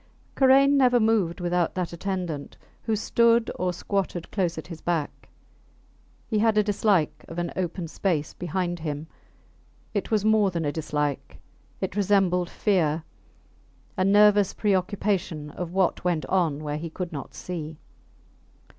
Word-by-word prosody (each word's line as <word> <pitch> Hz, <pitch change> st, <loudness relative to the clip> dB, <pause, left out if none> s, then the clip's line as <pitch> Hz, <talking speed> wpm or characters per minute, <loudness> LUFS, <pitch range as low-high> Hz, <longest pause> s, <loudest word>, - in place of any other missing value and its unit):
Karain 275 Hz, +1 st, +5 dB
never 250 Hz, -2 st, +5 dB
moved 215 Hz, -6 st, +1 dB
without 175 Hz, -1 st, 0 dB
that 180 Hz, -2 st, -2 dB
attendant, 175 Hz, -5 st, -4 dB, 0.2 s
who 225 Hz, -, -1 dB
stood 235 Hz, +2 st, +3 dB
or 180 Hz, 0 st, +1 dB
squatted 180 Hz, -1 st, -3 dB
close 180 Hz, -4 st, -1 dB
at -, -, -6 dB
his 165 Hz, -3 st, -9 dB
back. 165 Hz, -4 st, -3 dB, 1.0 s
He 215 Hz, -, 0 dB
had 220 Hz, 0 st, +3 dB
a 210 Hz, -, +5 dB
dislike 205 Hz, -5 st, +1 dB
of 165 Hz, -, -9 dB
an 175 Hz, -1 st, -2 dB
open 175 Hz, -1 st, -3 dB
space 160 Hz, -3 st, -1 dB
behind 175 Hz, 0 st, -3 dB
him. 150 Hz, -1 st, -4 dB, 0.9 s
It 205 Hz, -, -2 dB
was 215 Hz, -2 st, +1 dB
more 215 Hz, -2 st, +4 dB
than 170 Hz, -3 st, -3 dB
a 145 Hz, -, 0 dB
dislike 150 Hz, -2 st, -3 dB, 0.4 s
it -, -, -3 dB
resembled 190 Hz, -3 st, +2 dB
fear, 165 Hz, -6 st, +1 dB, 0.9 s
a 185 Hz, -, +1 dB
nervous 205 Hz, 0 st, +5 dB
preoccupation 190 Hz, -6 st, -1 dB
of 175 Hz, +1 st, -5 dB
what 185 Hz, -2 st, +1 dB
went 175 Hz, -3 st, 0 dB
on 165 Hz, -6 st, 0 dB
where 150 Hz, 0 st, -3 dB
he 165 Hz, +2 st, -5 dB
could 175 Hz, +2 st, -5 dB
not 140 Hz, -3 st, -7 dB
see. 160 Hz, -3 st, -6 dB
180 Hz, 145 wpm, -25 LUFS, 165-205 Hz, 1.0 s, Karain